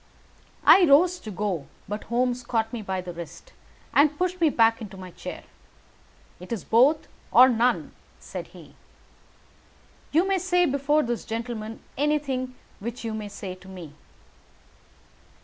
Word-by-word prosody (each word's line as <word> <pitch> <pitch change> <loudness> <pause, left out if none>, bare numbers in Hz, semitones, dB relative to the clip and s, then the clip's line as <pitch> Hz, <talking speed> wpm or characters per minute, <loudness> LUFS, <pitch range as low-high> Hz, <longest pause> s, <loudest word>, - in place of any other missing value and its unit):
I 375 - +8
rose 345 +5 +5
to 220 - -9
go, 190 -7 -3 0.2
but 210 +1 -5
Holmes 245 +1 0
caught 225 -2 -1
me 235 - -3
by 190 -2 -3
the 180 -1 -7
wrist 170 0 -10 0.4
and 295 +1 +4
pushed 365 +1 -1
me 325 - +5
back 225 -4 +3
into 200 -3 -8
my 185 -1 -9
chair. - - -8 1.0
"It 180 +4 -11
is 225 -5 -3
both, 265 +7 +4 0.2
or 255 - +8
none," 245 0 +1 0.3
said - - -7
he. - - -15 1.4
"You 335 +5 +3
may 390 -1 +2
say 360 0 +2
before 290 +1 +2
this 240 -1 -2
gentleman 225 -1 -5 0.2
anything 275 -4 0 0.2
which 235 +4 -6
you 225 - -2
may 215 -1 -4
say 200 -2 -7
to 185 +1 -15
me." 180 -6 -10
235 Hz, 150 wpm, -25 LUFS, 205-290 Hz, 1.4 s, I